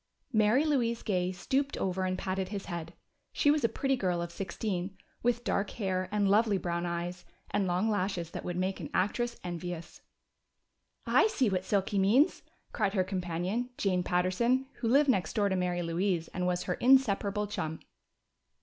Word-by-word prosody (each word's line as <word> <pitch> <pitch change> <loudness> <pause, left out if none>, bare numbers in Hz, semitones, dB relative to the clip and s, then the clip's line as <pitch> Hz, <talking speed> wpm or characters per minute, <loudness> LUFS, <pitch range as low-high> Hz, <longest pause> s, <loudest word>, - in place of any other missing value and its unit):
Mary 220 +7 +4
Louise 240 -6 +1
Gay 185 -3 0
stooped 270 +10 -1
over 185 0 -1
and 185 0 -1
patted 190 -1 -2
his 200 -1 -5
head. 170 -2 -5 0.4
She 290 - +4
was 300 -2 +1
a 230 - +4
pretty 270 -1 0
girl 180 -7 0
of 170 0 -4
sixteen, 190 0 -4 0.2
with 240 0 +1
dark 200 -4 0
hair 185 -3 -1
and 205 -1 +2
lovely 210 +1 +4
brown 170 -1 -2
eyes 175 +1 -4 0.3
and 200 -2 +1
long 180 +4 +1
lashes 185 -5 -1
that - - -6
would 175 0 -3
make 190 +1 -1
an - - -6
actress 235 +5 0
envious. 175 -1 -6 1.0
"I - - +5
see 290 - +1
what 185 0 -1
Silky 200 0 +1
means!" 225 +10 +4 0.3
cried 210 -2 0
her 185 - +3
companion, 185 +5 -2
Jane 185 -3 +1
Patterson 185 +9 +1
who 235 - -2
lived 280 +5 +5
next 185 -9 -1
door 205 -2 +2
to 190 - 0
Mary 180 -1 0
Louise 170 0 0
and 180 0 -2
was 180 0 0
her 180 - -1
inseparable 210 -4 +3
chum. 160 -6 -4
190 Hz, 175 wpm, -30 LUFS, 180-225 Hz, 1.0 s, I